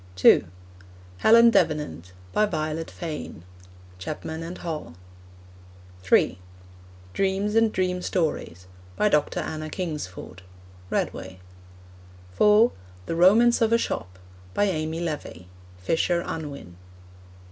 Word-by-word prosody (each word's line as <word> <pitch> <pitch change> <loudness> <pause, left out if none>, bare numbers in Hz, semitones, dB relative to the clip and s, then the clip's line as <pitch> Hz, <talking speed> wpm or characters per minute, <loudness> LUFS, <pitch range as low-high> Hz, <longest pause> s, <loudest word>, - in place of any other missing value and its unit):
(2) 95 +1 +5 0.7
Helen 230 - +7
Davenant. 90 - 0 0.2
By 215 - +3
Violet 155 -2 -3
Fane. 155 - -7 0.6
(Chapman 95 - -5
and 170 +2 -6
Hall.) 155 - -6 1.1
(3) 95 -1 +2 0.7
Dreams 195 +2 0
and 225 0 +3
Dream 180 -2 -1
Stories. 155 - -2 0.3
By 210 - +2
Dr. 150 -5 +1
Anna 155 0 -5
Kingsford. 150 - -6 0.5
(Redway.) 95 0 -3 0.9
(4) 210 - +5 0.3
The 165 - -3
Romance 220 +8 +5
of 225 -1 +3
a 230 - +5
Shop. 90 - -4 0.4
By - - +2
Amy 160 -4 -1
Levy. 150 - -5 0.3
(Fisher 165 - 0
Unwin.) 140 - -7
160 Hz, 105 wpm, -25 LUFS, -, 1.1 s, Helen